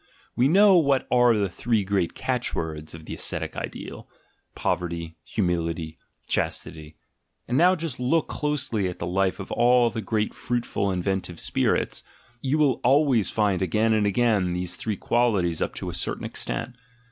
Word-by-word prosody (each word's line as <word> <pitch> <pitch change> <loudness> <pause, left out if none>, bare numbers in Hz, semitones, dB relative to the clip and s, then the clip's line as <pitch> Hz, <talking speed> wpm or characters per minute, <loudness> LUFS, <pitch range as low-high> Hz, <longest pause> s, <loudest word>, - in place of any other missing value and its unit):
We 125 - +3
know 195 +3 +6
what 140 -4 +2
are 120 -2 +5
the 100 -2 +1
three 110 +3 0
great 95 -3 -1
catch 125 -1 -1
words 80 -1 -4
of 80 -1 -11
the - - -6
ascetic - - -4
ideal: - - -7 0.5
pov - - 0
erty, 85 -2 -5
humility, 85 -4 -2 0.3
chastity; 80 -1 -2 0.5
and 125 - -1
now 180 +6 +5
just 165 -7 -4
look 145 +6 +1
closely 140 -9 -1
at 90 - -7
the - - -4
life 95 +1 0
of - - -7
all 120 0 +4
the 115 - -4
great 110 -1 -1
fruitful 120 -4 -2
inventive 90 -2 -2
spirits - - 0 0.2
— 120 0 -32
you 140 +3 0
will 145 -5 +2
always 130 - +3
find 100 -4 +1
again 110 +5 +2
and 105 -1 +2
again 100 -4 +2
these 90 0 -3
three 105 +3 -3
qualities 100 -10 +1
up - - -2
to - - -4
a - - -4
certain - - -2
extent. 125 +1 -4
110 Hz, 170 wpm, -25 LUFS, 90-125 Hz, 0.5 s, know